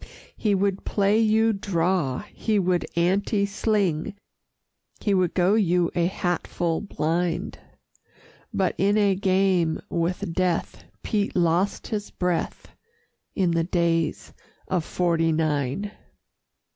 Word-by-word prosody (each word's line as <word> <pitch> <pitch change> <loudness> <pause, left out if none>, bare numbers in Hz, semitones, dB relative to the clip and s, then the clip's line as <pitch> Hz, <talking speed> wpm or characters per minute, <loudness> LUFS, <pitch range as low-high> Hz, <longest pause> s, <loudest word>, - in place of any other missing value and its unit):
He 210 -3 +1
would 195 0 0
play 205 +1 +2
you 220 0 +3
Draw, 180 -7 0
he 220 -2 0
would 180 -3 +1
Ante 195 +4 +1
sling, 200 -3 0 0.8
He 205 - 0
would 185 -3 +1
go 185 +2 +3
you 180 -5 +2
a 170 -1 +1
hatfull 175 -2 -2
Blind 170 -3 -2 0.9
But 190 -2 0
in 200 +2 +3
a 200 -2 +4
game 185 -4 +1
with 170 -1 -1
Death 180 -1 -1 0.2
Pete 210 -3 -1
lost 175 +3 +1
his 205 -2 -3
breath 180 -2 -2 0.7
In 185 -4 +2
the 165 0 +1
Days 165 -2 0 0.3
of 185 -3 0
'Forty 165 -2 +1
Nine. 155 +4 -1
180 Hz, 115 wpm, -25 LUFS, 170-200 Hz, 0.9 s, a